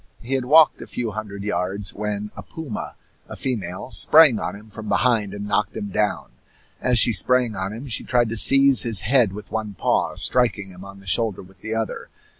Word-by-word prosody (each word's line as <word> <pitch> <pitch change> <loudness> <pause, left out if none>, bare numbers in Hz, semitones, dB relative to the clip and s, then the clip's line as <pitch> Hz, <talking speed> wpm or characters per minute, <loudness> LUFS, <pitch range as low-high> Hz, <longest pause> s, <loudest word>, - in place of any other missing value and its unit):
He 125 +3 -5
had 130 -2 -1
walked 155 +3 +5
a - - -9
few 120 -3 -4
hundred 100 -1 -7
yards, 95 0 -3
when 105 0 -5
a - - -8
puma, 155 -9 -8 0.3
a - - -8
female, 105 -3 -5
sprang 150 -8 +5
on - - -5
him 105 +2 -14
from 110 0 -8
behind 115 -5 +1
and 100 0 -7
knocked 105 0 -2
him 105 - -5
down. 105 - -2 0.5
As 125 -1 +2
she 120 - +7
sprang 120 +3 +2
on 95 +1 -4
him 115 +6 -9
she 115 - -3
tried 120 -2 0
to 115 - -4
seize 135 +3 +6
his 115 -5 +3
head 120 -2 +2
with 100 -1 -11
one 110 -2 -5
paw, - - -1
striking 115 -6 -1
him 90 +1 -13
on 100 0 -13
the - - -19
shoulder 100 +3 -1
with 95 +1 -20
the 110 0 -4
other. 110 -1 -5
110 Hz, 210 wpm, -21 LUFS, 100-125 Hz, 0.5 s, she